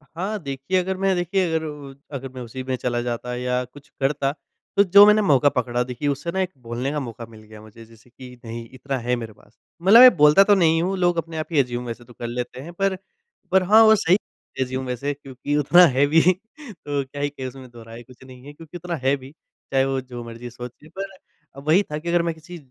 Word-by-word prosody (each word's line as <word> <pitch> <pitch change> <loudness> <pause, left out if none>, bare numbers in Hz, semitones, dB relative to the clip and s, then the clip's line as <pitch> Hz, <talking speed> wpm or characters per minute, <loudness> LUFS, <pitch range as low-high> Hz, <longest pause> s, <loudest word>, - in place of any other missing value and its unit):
हाँ, 200 +5 -3
देखिए 140 +7 -2
अगर 190 +1 -2
मैं 195 -1 +1
देखिए 180 +2 0
अगर 160 -1 -1
उ 145 -2 -8 0.2
अगर 135 -1 -5
मैं 130 - -8
उसी 130 +2 -7
में 130 0 -2
चला 120 -1 -2
जाता 120 0 -4
या 125 0 -1
कुछ 145 +3 -17
करता 135 0 0 0.5
तो 200 - +7
जो 200 +2 +8
मैंने 210 0 +5
मौका 145 -6 +4
पकड़ा 125 -1 -1
देखिए 125 +3 -5
उससे 140 +5 -3
ना 190 +1 -1
एक 185 0 -2
बोलने 120 +4 -4
का 150 - -2
मौका 115 -3 -7
मिल 110 -1 -15
गया 110 0 -14
मुझे 110 +1 -14
जैसे 115 +2 -21
कि 125 0 -13
नहीं 115 +1 -7
इतना 135 +1 -4
है 125 0 +1
मेरे 115 -3 -7
पास। 110 - -25 0.2
मतलब 205 +6 +7
मैं 255 -6 +9
बोलता 150 +6 +7
तो 205 0 +4
नहीं 165 -3 +3
हूँ 190 +2 -1
लोग 175 -1 +1
अपने 165 0 -4
आप 155 - -2
ही 150 - +2
एज्यूम 125 -1 -1
वैसे 120 0 -7
तो 120 - -16
कर 120 - -6
लेते 125 +1 -5
हैं 170 +4 -10
पर, 195 +1 0 0.6
पर 190 -1 +4
हाँ, 215 +4 +6
वो 220 0 +7
सही 185 0 +3 0.4
एज्यूम 130 0 -3
वैसे 140 +4 -3
क्योंकि 140 +1 -5
उतना 175 +5 +6
है 140 +2 +4
भी 160 +2 +4 0.5
तो 145 -7 -4
क्या 140 +2 -9
है 145 - 0
कि 135 -2 -8
उसमें 130 0 -11
दोहराए 115 0 -12
कुछ 130 +2 -18
नहीं 130 0 -14
है 145 - -10
क्योंकि 165 +3 -11
उतना 175 0 -5
है 135 +2 +3
भी, 135 +1 -13 0.4
चाहे 135 0 +3
वो 135 -1 -1
जो 125 -2 -9
मर्जी 115 +1 -9
सोचें 125 +5 -11
पर 195 +1 -7 0.4
अब 140 +2 -12
वही 180 +6 +4
था 150 - -2
कि 170 +2 -5
अगर 175 0 +3
मैं 170 -1 -1
किसी 175 +2 -11
140 Hz, 240 wpm, -22 LUFS, 125-170 Hz, 0.6 s, मैं